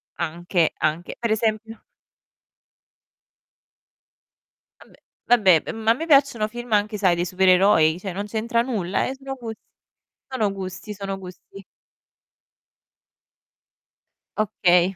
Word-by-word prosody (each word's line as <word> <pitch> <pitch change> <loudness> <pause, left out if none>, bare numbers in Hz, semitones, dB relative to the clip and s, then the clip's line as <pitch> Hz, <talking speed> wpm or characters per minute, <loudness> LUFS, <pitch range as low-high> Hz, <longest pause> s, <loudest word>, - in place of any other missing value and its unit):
Anche, 170 +1 -1
anche. 155 +3 -2
Per 235 -2 -1
esempio 220 0 -1 3.0
Vabbè, - - -19 0.3
vabbè, 195 -9 +5
ehm, - - -5
ma 225 0 +2
a - - +5
me 320 +7 -5
piacciono 275 -8 +3
film 240 +1 -9
anche 210 +1 +1
sai 185 -4 +3
dei 175 +1 -1
supereroi, 185 -3 +4
cioè 190 -1 -5
non 200 +2 -4
c'entra 230 +2 -1
nulla, 205 -7 -1
eh 265 - -4
sono 270 0 -7
gus 230 -3 -7 0.7
sono 220 -6 -1
gusti, 190 +2 -7
sono 195 -1 -5
gusti. 190 +1 -12 2.7
Okay. 185 -3 +2
205 Hz, 110 wpm, -23 LUFS, 185-225 Hz, 3.0 s, vabbè